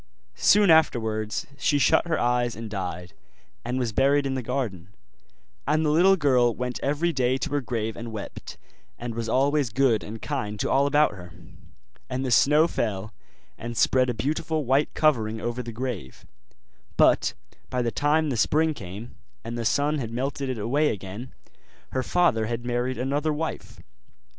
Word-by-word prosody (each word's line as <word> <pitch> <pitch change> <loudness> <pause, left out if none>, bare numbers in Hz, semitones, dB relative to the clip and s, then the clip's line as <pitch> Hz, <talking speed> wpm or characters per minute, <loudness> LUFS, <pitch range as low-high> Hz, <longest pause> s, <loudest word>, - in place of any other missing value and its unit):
Soon 205 - +5
afterwards 110 -9 +2
she 145 - +2
shut 145 +4 +3
her 160 - 0
eyes 120 0 +1
and 110 -1 -7
died, 90 -3 -5 0.5
and 125 - -2
was 125 -3 -1
buried 140 +4 +3
in 135 - -1
the 130 - -2
garden; 115 -8 -3 0.8
and 155 +1 +2
the 150 - +2
little 180 +5 +5
girl 125 -8 +3
went 125 0 -4
every 155 +5 0
day 130 -1 +1
to 145 - -4
her 145 0 0
grave 115 -3 -3
and 115 0 -7
wept, 105 -2 -8 0.4
and 120 -1 -5
was 115 0 -4
always 140 +2 +2
good 115 -2 +2
and 110 +2 -7
kind 105 -8 -4
to - - -1
all 140 +1 +3
about 150 +1 +3
her. 90 -3 -11 0.8
And 130 +1 -2
the 130 - -2
snow 150 +10 +5
fell 105 - -3 0.5
and 120 0 -6
spread 130 +2 +3
a 120 - -1
beautiful 150 +5 -1
white 135 +4 +2
covering 110 -8 +2
over 120 +2 -3
the 120 -1 -7
grave; 115 - -6 0.7
but - - +4 0.3
by 125 -1 -1
the 115 - -1
time 150 +3 +1
the 125 - -2
spring 155 +6 +2
came, 105 0 -9 0.3
and 115 - -5
the 120 - -3
sun 145 +5 +1
had 115 -4 -4
melted 135 +3 -3
it 130 - -2
away 140 +8 +1
again, 100 +6 -6 0.6
her 130 - 0
father 130 -9 +2
had 120 +1 -4
married 125 +1 -1
another 140 +5 0
wife. 155 +2 -5
125 Hz, 170 wpm, -25 LUFS, 115-145 Hz, 0.8 s, Soon